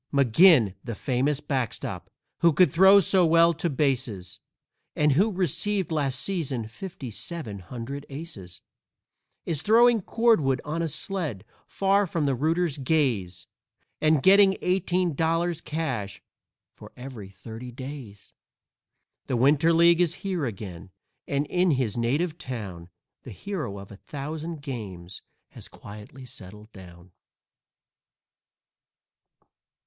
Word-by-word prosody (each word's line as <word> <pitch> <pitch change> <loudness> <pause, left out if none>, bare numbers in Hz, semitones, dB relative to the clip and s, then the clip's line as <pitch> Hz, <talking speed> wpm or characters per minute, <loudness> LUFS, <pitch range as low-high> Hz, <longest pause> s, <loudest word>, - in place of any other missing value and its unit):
McGinn, 140 - +5
the 115 -3 -5
famous 135 +5 0
backstop, 130 -6 -4 0.3
who 170 -1 +4
could 180 +5 +4
throw 190 +4 +7
so 190 0 +3
well 165 0 +5
to 165 +2 -2
bases, 125 - -1 0.6
And 150 0 +3
who 195 +11 +3
received 190 0 -1
last 140 -4 -1
season 140 - -2
fifty 135 - -8
seven 110 - -6
hundred 125 +9 -7
aces, 135 - -8 0.8
Is 155 -4 -2
throwing 230 +2 +5
cordwood 185 - +2
on 155 +3 -2
a 165 - 0
sled, 155 - -4 0.2
far 195 +1 +2
from 165 -3 -1
the 140 - +1
rooters' 155 +3 0
gaze, 125 - 0 0.6
And 155 -2 +3
getting 195 0 +6
eighteen 180 -1 +1
dollars 165 +2 0
cash 130 -11 -4 0.5
for - - -14
every 125 -6 -9
thirty 110 +5 -9
days. 130 -5 -10 0.9
_The 125 - 0
Winter 145 +6 +4
League 170 +1 +5
is 175 -3 +1
here 180 -6 -1
again, 95 -4 -8 0.4
and 140 +1 0
in 180 +4 +1
his 130 -8 0
native 150 +9 -1
town 95 -9 -7 0.3
The - - -11
hero 150 - -5
of 100 +1 -11
a 100 - -11
thousand 150 +4 -6
games 100 - -7 0.3
has - - -8
quietly 105 +6 -12
settled 105 -1 -11
down. 90 -2 -14
140 Hz, 125 wpm, -26 LUFS, 115-170 Hz, 0.9 s, throw